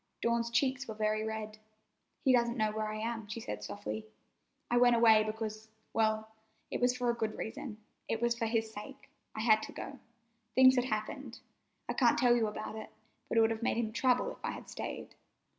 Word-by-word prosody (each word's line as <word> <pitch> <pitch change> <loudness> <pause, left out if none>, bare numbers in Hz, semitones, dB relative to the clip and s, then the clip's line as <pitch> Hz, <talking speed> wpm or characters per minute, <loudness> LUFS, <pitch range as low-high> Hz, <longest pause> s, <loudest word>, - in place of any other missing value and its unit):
Dawn's 235 0 +1
cheeks 265 +2 +1
were 220 - -5
very 215 0 0
red. 215 -1 -4 0.7
"He 260 - +6
doesn't 235 0 +2
know 215 -1 +2
where 215 0 -2
I - - -4
am," 225 0 -3
she 210 +3 -5
said 105 - -5
softly. 105 +1 -5 0.6
"I 240 - +4
went 245 0 +6
away 225 -2 +7
because—well, 220 0 -2 0.4
it - - -2
was 245 0 +3
for 245 -1 +2
a - - -3
good 220 -2 -2
reason. 220 0 -5 0.3
It 225 - -1
was 235 0 +2
for 230 -1 -1
his 220 -1 0
sake. 270 +7 -9 0.3
I 215 - -2
had 220 -1 +5
to - - -7
go. 275 - -7 0.6
Things 260 0 +8
had 250 -1 +2
happened. 235 +3 -3 0.5
I - - -1
can't - - +4
tell 245 -2 +5
you 230 -2 +2
about 215 +1 -5
it, 220 - -7 0.4
but - - 0
it - - +7
would 225 0 +4
have 225 0 -3
made 235 - +1
him 225 -2 0
trouble 250 +1 +2
if - - -13
I - - -1
had - - -9
stayed." - - -6
225 Hz, 205 wpm, -33 LUFS, 215-240 Hz, 0.7 s, Things